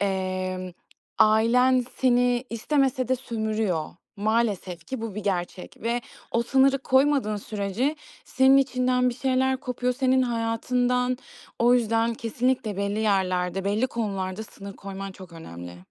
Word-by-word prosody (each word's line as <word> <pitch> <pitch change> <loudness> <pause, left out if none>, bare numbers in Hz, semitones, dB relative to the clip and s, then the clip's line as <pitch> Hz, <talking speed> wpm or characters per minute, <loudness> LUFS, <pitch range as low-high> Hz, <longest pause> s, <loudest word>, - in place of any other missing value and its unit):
emm, 185 -2 -2 0.5
ailen 245 +4 +4
seni 245 -1 +2
istemese 260 +1 0
de 260 - +2
sömürüyor. 220 -8 -2 0.3
Maalesef 205 -5 -1
ki 265 - -5
bu 225 -3 -5
bir 210 - -5
gerçek 180 -2 -3
ve 235 +2 0 0.3
o 235 - +1
sınırı 270 +2 +3
koymadığın 265 -5 +2
sürece 210 +8 -2 0.3
senin 265 +1 +4
içinden 255 -2 +2
bir 245 - -2
şeyler 265 0 +1
kopuyor, 250 -2 -1
senin 260 0 +2
hayatından. 250 +1 0 0.4
O 240 +1 +5
yüzden 230 -1 +1
kesinlikle 230 -2 -1
belli 200 +1 -1
yerlerde, 190 -3 0
belli 210 +5 +1
konularda 200 -4 -3
sınır 200 -2 -10
koyman 195 0 -7
çok 185 -2 -13
önemli. 90 - -9
230 Hz, 130 wpm, -25 LUFS, 195-255 Hz, 0.5 s, O